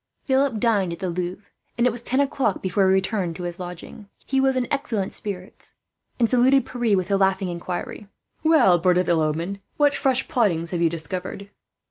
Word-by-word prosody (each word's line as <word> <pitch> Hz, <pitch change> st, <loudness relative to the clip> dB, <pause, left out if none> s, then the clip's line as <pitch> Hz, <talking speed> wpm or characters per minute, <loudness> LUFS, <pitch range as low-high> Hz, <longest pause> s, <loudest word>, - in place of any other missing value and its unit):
Philip 265 Hz, -3 st, +1 dB
dined 205 Hz, -6 st, +1 dB
at -, -, -7 dB
the 185 Hz, -2 st, -3 dB
Louvre, 180 Hz, +3 st, -4 dB, 0.3 s
and 235 Hz, -, +2 dB
it 250 Hz, -, +4 dB
was 235 Hz, +1 st, -1 dB
ten 260 Hz, +2 st, +1 dB
o'clock 270 Hz, -6 st, 0 dB
before 190 Hz, +1 st, +2 dB
he -, -, +4 dB
returned 190 Hz, -3 st, -1 dB
to 180 Hz, -, -7 dB
his 175 Hz, 0 st, -5 dB
lodging. 180 Hz, +3 st, -9 dB, 0.2 s
He 270 Hz, 0 st, +1 dB
was 265 Hz, 0 st, +2 dB
in 250 Hz, -2 st, 0 dB
excellent 235 Hz, -9 st, -2 dB
spirits, 190 Hz, -2 st, -7 dB, 0.4 s
and 235 Hz, -, +3 dB
saluted 260 Hz, +3 st, +3 dB
Pierre 235 Hz, -5 st, 0 dB
with 185 Hz, 0 st, -2 dB
the 200 Hz, -, +2 dB
laughing 190 Hz, -1 st, +1 dB
inquiry: 175 Hz, +4 st, -5 dB, 0.3 s
"Well, 310 Hz, -, +4 dB
bird 180 Hz, +1 st, +3 dB
of 180 Hz, -, +1 dB
ill 170 Hz, -2 st, +3 dB
omen, 165 Hz, +6 st, -2 dB, 0.2 s
what 290 Hz, -1 st, +4 dB
fresh 265 Hz, -2 st, +2 dB
plottings 200 Hz, -, 0 dB
have 175 Hz, -2 st, -2 dB
you 170 Hz, -, +4 dB
discovered?" 185 Hz, +4 st, -5 dB
195 Hz, 195 wpm, -23 LUFS, 180-245 Hz, 0.4 s, it